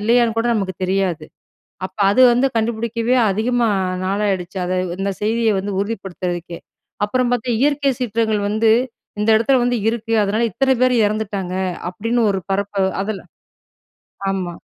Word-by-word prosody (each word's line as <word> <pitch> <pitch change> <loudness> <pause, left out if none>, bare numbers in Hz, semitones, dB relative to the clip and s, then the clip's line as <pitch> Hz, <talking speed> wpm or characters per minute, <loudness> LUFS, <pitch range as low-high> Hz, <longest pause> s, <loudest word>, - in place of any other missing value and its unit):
இல்லையான்னு 230 +1 +2
கூட 230 - +1
நமக்கு 195 -3 -2
தெரியாது? 185 -4 0 0.6
அப்போ 190 +2 -13
அது 255 +6 +4
வந்து 250 +3 +3
கண்டுபிடிக்கவே 230 +2 0
அதிகமா 230 +3 +1 0.4
நாளாயிடுச்சு. 195 -2 -1
அதை 185 +1 -1 0.2
இந்த 195 +1 -1
செய்திய 225 +1 +2
வந்து 200 +2 -3
உறுதிப்படுத்துறதுக்கே! 180 -5 -4 0.5
அப்புறம் 250 +3 0
பார்த்தா 245 0 0
"இயற்கை 285 0 +2
சீற்றங்கள் 220 -3 0
வந்து 220 +1 +2 0.5
இந்த 210 - +2
இடத்தில 230 +4 +3
வந்து 245 0 +1
இருக்கு. 230 0 -4
அதனால, 210 +3 0
இத்தனை 265 +5 +2
பேர் 255 0 +4
இறந்துட்டாங்க" 200 -3 -3 0.4
அப்படின்னு 230 +6 -1
ஒரு 195 -1 -1
பரப்ப 200 +1 -1 0.3
அதில 205 0 -3 1.1
ஆமா. 185 -3 -3
215 Hz, 135 wpm, -19 LUFS, 195-235 Hz, 1.1 s, அது